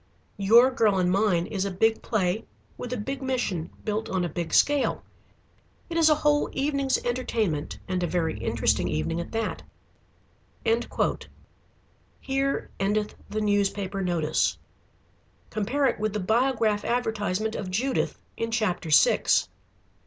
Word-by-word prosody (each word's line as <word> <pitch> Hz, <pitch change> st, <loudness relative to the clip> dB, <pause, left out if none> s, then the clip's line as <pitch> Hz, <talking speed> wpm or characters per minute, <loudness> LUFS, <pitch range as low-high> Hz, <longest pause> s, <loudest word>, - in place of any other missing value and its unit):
"'Your 230 Hz, +6 st, +6 dB
Girl 220 Hz, -6 st, +2 dB
and 180 Hz, -1 st, +2 dB
Mine' 190 Hz, -3 st, +2 dB
is 195 Hz, -1 st, -2 dB
a 200 Hz, -, -1 dB
big 220 Hz, +4 st, +1 dB
play 200 Hz, -1 st, 0 dB, 0.3 s
with 245 Hz, -, -7 dB
a 250 Hz, -, -1 dB
big 270 Hz, +6 st, -4 dB
mission 245 Hz, -11 st, -2 dB, 0.2 s
built 215 Hz, 0 st, -2 dB
on 185 Hz, -2 st, 0 dB
a -, -, -3 dB
big 165 Hz, +1 st, -4 dB
scale. 290 Hz, -1 st, +2 dB, 0.9 s
It -, -, -3 dB
is 325 Hz, -1 st, +5 dB
a 305 Hz, -, +5 dB
whole 295 Hz, -1 st, +2 dB
evening's 275 Hz, -1 st, +1 dB
entertainment, 230 Hz, -10 st, -1 dB
and 185 Hz, -1 st, -1 dB
a 175 Hz, -, 0 dB
very 165 Hz, -2 st, -1 dB
interesting -, -, +1 dB
evening 165 Hz, -, -1 dB
at 170 Hz, -, -8 dB
that." 225 Hz, -1 st, -2 dB, 2.6 s
Here 275 Hz, +1 st, -1 dB
endeth 210 Hz, +2 st, 0 dB, 0.2 s
the 215 Hz, -, -2 dB
newspaper 200 Hz, -1 st, 0 dB
notice. 170 Hz, -4 st, +1 dB, 0.9 s
Compare 240 Hz, +7 st, 0 dB
it 260 Hz, -, +1 dB
with 215 Hz, -1 st, -1 dB
the 210 Hz, -, -1 dB
Biograph 220 Hz, 0 st, +1 dB
advertisement 220 Hz, -3 st, -1 dB
of 195 Hz, -4 st, -4 dB
Judith 250 Hz, +8 st, -1 dB, 0.2 s
in 230 Hz, -, -2 dB
chapter 200 Hz, -7 st, -1 dB
six. 145 Hz, -2 st, +4 dB
215 Hz, 140 wpm, -26 LUFS, 185-250 Hz, 2.6 s, Your